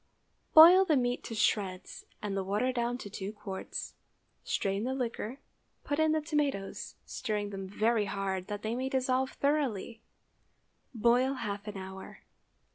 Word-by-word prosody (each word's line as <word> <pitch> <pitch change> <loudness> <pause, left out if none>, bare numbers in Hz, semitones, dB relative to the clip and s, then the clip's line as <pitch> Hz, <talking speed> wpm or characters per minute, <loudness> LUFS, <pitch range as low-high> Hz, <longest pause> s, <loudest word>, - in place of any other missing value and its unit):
Boil 345 +4 +10
the 320 -6 +3
meat 245 -1 0
to 225 - -5
shreds 195 -3 -1 0.2
and 200 -2 -2
the 195 - -1
water 210 +7 0
down 240 0 -1
to 230 - -8
two 195 0 -5
quarts. 205 -3 -6 0.5
Strain 195 +1 -1
the 260 +2 -1
liquor, 245 -1 -3 0.5
put 290 +1 -2
in 315 0 +4
the 310 0 +1
tomatoes, 290 -10 -2
stirring 210 -4 -3
them 195 -1 -5
very 215 +1 +1
hard 195 -1 -3
that 205 -1 -5
they 220 +1 -1
may 260 +2 -2
dissolve 260 0 0
thoroughly; 270 -7 -1 0.9
boil 245 +4 +3
half 205 -4 -5
an 205 -1 -5
hour. 190 0 -9
225 Hz, 150 wpm, -31 LUFS, 200-260 Hz, 0.9 s, Boil